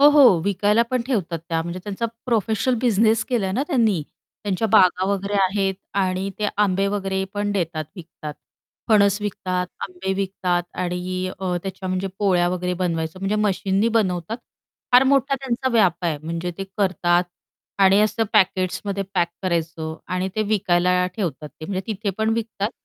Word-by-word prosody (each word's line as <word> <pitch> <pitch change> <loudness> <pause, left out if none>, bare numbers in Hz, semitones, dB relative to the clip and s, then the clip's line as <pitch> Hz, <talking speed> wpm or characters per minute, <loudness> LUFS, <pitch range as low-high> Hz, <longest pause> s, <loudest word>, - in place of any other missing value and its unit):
हो, 290 - +9
हो, 275 - +7
विकायला 205 +3 +3
पण 255 -2 +1
ठेवतात 185 -10 -1
त्या. 165 -1 0
म्हणजे 170 +2 -5
त्यांचा 205 +3 -2 0.2
प्रोफेशनल 225 +1 +1
बिझनेस 225 -1 +3
केलाय 210 -7 0
ना 250 +7 0
त्यांनी. 225 - +2 0.4
त्यांच्या 205 +2 0
बागा 185 -1 +5
वगैरे 200 +1 -2
आहेत 195 0 0 0.2
आणि 190 0 0
ते 210 - 0
आंबे 195 -1 +2
वगैरे 195 -1 -1
पण 205 0 -1
देतात 165 -5 -2
विकतात, 155 -4 -8 0.5
फणस 205 -2 +4
विकतात, 185 -3 -2
आंबे 190 +1 -3
विकतात 185 -2 -1 0.2
आणि 180 +1 -2
अ, 185 -2 -1
त्याच्या 190 -1 -5
म्हणजे 185 +1 -1
पोळ्या 180 -4 +3
वगैरे 180 0 -1
बनवायचं 170 -1 -2
म्हणजे 195 +2 0
मशीननी 200 0 +1
बनवतात 185 -1 0 0.6
फार 250 +2 +8
मोठा 275 0 +3
त्यांचा 260 -1 -2
व्याप 180 -6 +3
आहे. 160 -3 0
म्हणजे 165 +2 -3
ते 195 - -3
करतात 180 -2 +2 0.6
आणि 195 +1 +6
असं 215 +2 +2
पॅकेट्समध्ये 190 +1 +1
पॅक 170 - +2
करायचं 165 -3 -2 0.2
आणि 185 +1 -1
ते 215 - +1
विकायला 180 -3 +2
ठेवतात 155 - -3
ते. 155 - -12
म्हणजे 190 +2 -2
तिथे 210 -1 -2
पण 220 0 +1
विकतात 220 -2 -2
190 Hz, 160 wpm, -22 LUFS, 180-210 Hz, 0.6 s, हो